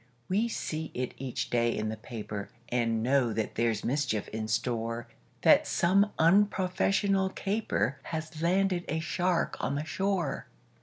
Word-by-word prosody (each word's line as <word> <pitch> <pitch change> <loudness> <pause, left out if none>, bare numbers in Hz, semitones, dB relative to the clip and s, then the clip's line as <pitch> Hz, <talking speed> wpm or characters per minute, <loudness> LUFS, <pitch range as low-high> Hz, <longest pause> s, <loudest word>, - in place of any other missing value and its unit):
We 210 +5 +2
see 160 -8 -3
it 125 0 -2
each 130 -2 -3
day 120 -1 +2
in 110 0 -1
the 110 - -3
paper, 105 -3 -6 0.2
And 115 -2 +1
know 130 -1 +3
that 110 0 -2
there's 115 -2 0
mischief 130 -5 0
in 110 0 -4
store; 115 +1 -1 0.4
That - - +6
some 195 +4 +3
unprofessional 195 +2 +3
caper 190 - -1
Has 155 -1 -5
landed 180 +1 +2
a 160 - 0
shark 175 +2 0
on 140 - -1
the 145 +2 -2
shore. 185 -5 -1
145 Hz, 145 wpm, -29 LUFS, 115-185 Hz, 0.4 s, That